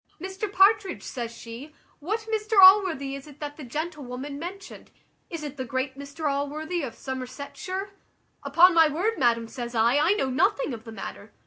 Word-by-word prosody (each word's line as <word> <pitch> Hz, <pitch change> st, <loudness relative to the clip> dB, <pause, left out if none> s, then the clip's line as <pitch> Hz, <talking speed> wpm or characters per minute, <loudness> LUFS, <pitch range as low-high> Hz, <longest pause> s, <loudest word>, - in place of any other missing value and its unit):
`Mr 385 Hz, +3 st, -5 dB
Partridge,' 390 Hz, -1 st, +3 dB
says 235 Hz, -3 st, -5 dB
she, 235 Hz, +6 st, -10 dB, 0.3 s
`what 430 Hz, +8 st, -3 dB
Mr 435 Hz, -1 st, -1 dB
Allworthy 375 Hz, -8 st, +7 dB
is 275 Hz, +1 st, -10 dB
it 295 Hz, -1 st, -14 dB
that 290 Hz, -1 st, -6 dB
the 300 Hz, -, -10 dB
gentlewoman 280 Hz, -1 st, -5 dB
mentioned? 370 Hz, +4 st, -8 dB, 0.4 s
is 330 Hz, -3 st, -6 dB
it 290 Hz, -1 st, -6 dB
the 260 Hz, -, -3 dB
great 260 Hz, +2 st, -3 dB
Mr 280 Hz, +3 st, -5 dB
Allworthy 300 Hz, +5 st, -2 dB
of 250 Hz, -6 st, -5 dB
Somersetshire?' 280 Hz, +9 st, -6 dB, 0.5 s
`Upon 335 Hz, +6 st, +6 dB
my 325 Hz, -1 st, +6 dB
word, 365 Hz, +10 st, -1 dB
madam,' 230 Hz, -2 st, +2 dB
says 240 Hz, 0 st, -6 dB
I, 230 Hz, +4 st, +3 dB
`I 340 Hz, +8 st, +3 dB
know 265 Hz, -7 st, 0 dB
nothing 265 Hz, +1 st, +1 dB
of 225 Hz, 0 st, -8 dB
the 225 Hz, -, -8 dB
matter.' 100 Hz, -, -8 dB
290 Hz, 175 wpm, -26 LUFS, 260-360 Hz, 0.5 s, Allworthy